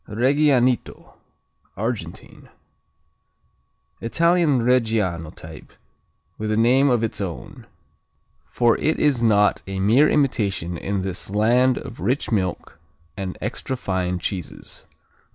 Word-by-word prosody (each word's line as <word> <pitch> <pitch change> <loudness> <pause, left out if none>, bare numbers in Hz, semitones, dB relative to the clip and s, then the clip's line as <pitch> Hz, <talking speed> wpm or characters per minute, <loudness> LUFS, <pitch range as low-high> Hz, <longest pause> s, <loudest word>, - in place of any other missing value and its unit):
Regianito 130 +2 +1 0.6
Argentine 105 -6 -6 1.5
Italian 165 +1 +2
Reggiano 110 -10 +1
type 80 0 -12 0.7
with 110 0 -3
a 110 - 0
name 130 +5 +4
of 120 -3 +1
its 110 - -3
own, 90 -4 -7 0.8
for 120 -1 +2
it 160 - 0
is 140 -5 +1
not 105 -3 +3
a 95 0 -4
mere 115 +10 +4
imitation 100 - 0
in 95 +2 -3
this 95 -1 -5
land 120 +5 +3
of 130 -3 -8
rich 130 +2 -1
milk 95 -5 -2 0.4
and 95 -2 -5
extra 130 - -4
fine 90 -4 -2
cheeses. 90 -1 -7
110 Hz, 110 wpm, -22 LUFS, 95-130 Hz, 1.5 s, name